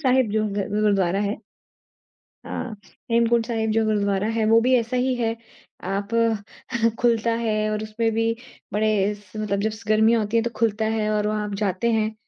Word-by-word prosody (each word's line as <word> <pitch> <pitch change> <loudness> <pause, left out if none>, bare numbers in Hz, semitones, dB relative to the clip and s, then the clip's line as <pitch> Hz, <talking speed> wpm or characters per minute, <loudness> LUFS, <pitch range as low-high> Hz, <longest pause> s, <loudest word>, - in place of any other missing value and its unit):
साहिब 260 -5 +3
जो 215 0 +1
ज़ 200 -1 -2
गुरुद्वारा 200 -3 +2
है। 205 +1 -1 1.1
हाँ। 235 -4 -5 0.3
हेमकुंड 230 0 +3
साहिब 225 -2 -1
जो 220 +1 +2
गुरुद्वारा 200 -2 +1
है 225 -1 +1
वो 225 +1 +5
भी 255 +2 +3
ऐसा 235 +2 -2
ही 255 +1 +1
है। 230 -1 -1 0.6
आप 200 +1 -2 0.9
खुलता 230 -1 +2
है 215 -2 0
और 215 0 -2
उसमें 225 +1 -1
भी 225 0 +1 0.5
बड़े 210 -1 +1
स 205 -2 -19
मतलब 210 -2 -1
जस 215 0 -8
गर्मीयाँ 220 +2 +4
होती 215 +2 -1
है 230 - +4
तो 235 - -2
खुलता 220 -1 +1
है 215 -1 0
और 210 0 +1
वहाँ 210 0 -1
आप 205 - -5
जाते 200 +3 0
हैं। 220 -1 0
215 Hz, 180 wpm, -23 LUFS, 210-230 Hz, 1.1 s, वो